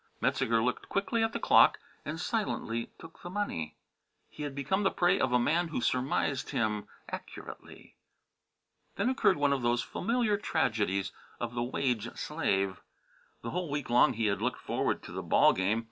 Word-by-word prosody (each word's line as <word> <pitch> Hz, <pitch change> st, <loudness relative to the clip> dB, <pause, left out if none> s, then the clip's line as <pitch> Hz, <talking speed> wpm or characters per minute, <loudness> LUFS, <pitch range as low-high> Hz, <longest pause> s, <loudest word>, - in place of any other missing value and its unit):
Metzeger 115 Hz, 0 st, +1 dB
looked 125 Hz, +1 st, -2 dB
quickly 200 Hz, +3 st, 0 dB
at 225 Hz, 0 st, +1 dB
the -, -, -3 dB
clock -, -, +6 dB, 0.3 s
and 155 Hz, +2 st, -5 dB
silently 160 Hz, -, -2 dB
took 165 Hz, 0 st, -13 dB
the 175 Hz, -, -7 dB
money. 80 Hz, -, -3 dB, 0.5 s
He -, -, -10 dB
had 145 Hz, -2 st, -4 dB
become 140 Hz, +8 st, 0 dB
the 195 Hz, -, +3 dB
prey 180 Hz, +2 st, +2 dB
of 130 Hz, -, +1 dB
a 125 Hz, -, +5 dB
man 165 Hz, +8 st, +2 dB
who 160 Hz, -, -3 dB
surmised 130 Hz, +2 st, 0 dB
him 105 Hz, -3 st, -1 dB, 0.2 s
accurately. -, -, -9 dB, 1.0 s
Then 255 Hz, -, +1 dB
occurred 260 Hz, -8 st, +3 dB
one 145 Hz, -1 st, +3 dB
of 135 Hz, -, -1 dB
those 120 Hz, 0 st, +1 dB
familiar 230 Hz, 0 st, 0 dB
tragedies 105 Hz, -, 0 dB, 0.3 s
of 120 Hz, 0 st, -3 dB
the 120 Hz, -, -2 dB
wage 120 Hz, -2 st, -1 dB
slave. 95 Hz, -, -1 dB, 0.6 s
The 115 Hz, -, -4 dB
whole 180 Hz, -2 st, -2 dB
week 145 Hz, -3 st, -3 dB
long 125 Hz, +1 st, +5 dB
he 115 Hz, -1 st, -1 dB
had 100 Hz, -1 st, 0 dB
looked -, -, -1 dB
forward -, -, -1 dB
to -, -, -9 dB
the -, -, -4 dB
ball -, -, +5 dB
game. 100 Hz, +4 st, +1 dB
130 Hz, 175 wpm, -30 LUFS, 115-175 Hz, 1.0 s, clock